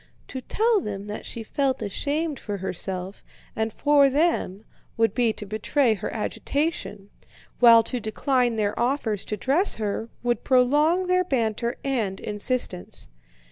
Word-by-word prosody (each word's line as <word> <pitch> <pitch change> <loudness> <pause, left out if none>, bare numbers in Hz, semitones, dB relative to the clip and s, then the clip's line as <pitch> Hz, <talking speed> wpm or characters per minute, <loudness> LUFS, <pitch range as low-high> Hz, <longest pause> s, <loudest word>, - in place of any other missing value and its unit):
To 260 - -5
tell 445 - +2
them 200 -5 -5
that 210 0 -6
she 230 - -6
felt 270 +3 -1
ashamed 290 - -2
for 205 -2 -4
herself 190 0 -4 0.3
and 220 0 -1
for 285 +2 +4
them 270 - 0 0.3
would 225 -3 +2
be 240 -2 +2
to 210 - -7
betray 220 +5 +1
her 205 - -5
agitation, 220 -3 -3 0.5
while 230 -2 +8
to 250 +2 -3
decline 240 +2 0
their 210 -1 0
offers 235 -5 0
to 210 - -3
dress 310 - +3
her 220 +1 -3
would 240 0 0
prolong 295 +8 +3
their 365 0 +2
banter 235 - -1
and 225 -9 -1
insistence. 210 - -3
235 Hz, 140 wpm, -25 LUFS, 210-280 Hz, 0.5 s, while